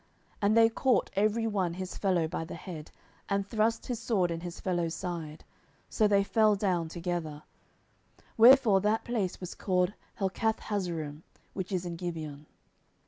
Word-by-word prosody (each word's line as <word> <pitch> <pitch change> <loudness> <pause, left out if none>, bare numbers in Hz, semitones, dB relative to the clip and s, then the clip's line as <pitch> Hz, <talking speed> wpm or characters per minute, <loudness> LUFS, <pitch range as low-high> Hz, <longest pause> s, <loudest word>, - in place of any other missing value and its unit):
10:002:016 - - -37 0.3
And 210 +2 +3
they 225 0 +7
caught 250 +2 +1
every 215 +3 +2
one 190 -6 0
his 185 0 -5
fellow 180 -5 +1
by 165 0 -3
the 165 - -7
head, 160 -5 -8 0.4
and 200 -1 0
thrust 220 +2 0
his 245 -3 -3
sword 200 -7 +1
in 165 - -3
his 175 0 -7
fellow's 175 -3 -1
side; 165 -4 -5 0.5
so 215 - +3
they 200 -1 +4
fell 215 +1 +3
down 180 -5 0
together: 165 -3 -4 0.9
wherefore 230 -4 +7
that 210 +2 +1
place 215 -7 -2
was 180 -1 -6
called 180 0 0 0.3
Helkathhazzurim, 190 -7 -2 0.3
which 190 0 -5
is 185 -2 -1
in 170 -1 -5
Gibeon. 155 -4 -6
185 Hz, 155 wpm, -30 LUFS, 170-215 Hz, 0.9 s, they